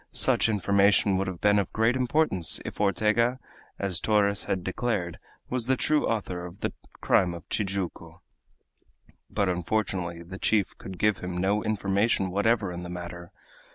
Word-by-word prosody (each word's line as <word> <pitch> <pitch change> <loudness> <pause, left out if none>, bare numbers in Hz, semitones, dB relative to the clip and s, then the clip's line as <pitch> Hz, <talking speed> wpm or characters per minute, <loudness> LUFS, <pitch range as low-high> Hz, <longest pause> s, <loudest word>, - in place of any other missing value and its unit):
Such - - +3
information 100 -1 +3
would 95 0 -1
have 90 -3 -5
been 105 0 +4
of 100 - -2
great 115 +3 +2
importance 125 - +1
if - - -5
Ortega, 110 +5 +2 0.4
as 95 -4 -1
Torres 100 -2 +2
had 95 -2 -2
declared, 95 -3 -2 0.3
was 125 -2 -1
the 130 0 +2
true 155 +3 +1
author 95 -6 -2
of 90 +2 -10
the - - -2 0.3
crime 90 -2 +3
of 85 - -11
Tijuco. 100 -3 -3 1.1
But 100 - 0
unfortunately 90 -1 -2
the 95 +3 -9
chief 105 -4 +1
could 95 -1 -8
give 105 0 +2
him 90 0 -5
no 100 +3 +1
information 100 -2 +1
whatever 100 0 +1
in 90 0 -6
the 90 - -7
matter. 85 0 -7
100 Hz, 155 wpm, -27 LUFS, 90-110 Hz, 1.1 s, been